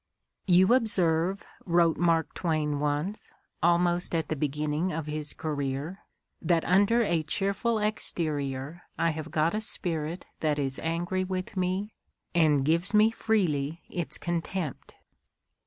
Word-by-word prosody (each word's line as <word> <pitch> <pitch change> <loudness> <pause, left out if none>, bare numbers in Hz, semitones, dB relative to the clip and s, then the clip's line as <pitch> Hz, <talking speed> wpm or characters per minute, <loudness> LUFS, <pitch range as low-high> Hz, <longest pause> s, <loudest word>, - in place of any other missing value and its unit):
' - - -57
You 185 +4 +6
observe, 190 -6 +2
' - - -24
' - - -26
wrote 170 -1 +4
Mark 165 -2 +2
Twain 155 -4 -1
once, 150 +8 -2 0.3
almost 175 +1 +2
at 160 -2 -1
the 155 - 0
beginning 150 +4 -1
of 160 -2 -3
his 150 0 -4
career, 145 +3 -3 0.4
"that 170 -1 +2
under 205 +6 +4
i - - 0
a 170 -4 +1
cheerful 200 +8 0
exterior 155 -8 -2 0.2
I 165 0 +2
have 155 0 -6
got 160 +1 +1
a 215 - -1
spirit 165 -5 -2
that 150 -2 +1
is 135 -2 -1
angry 175 +3 -1
with 185 +2 -4
I - - -1
me 185 +4 -1 0.4
and 150 -5 +3
gives 170 +7 +1
me 215 +1 +6
freely 170 -9 0
its 175 -3 -3
contempt." 175 -2 -4
170 Hz, 150 wpm, -28 LUFS, 155-185 Hz, 0.4 s, You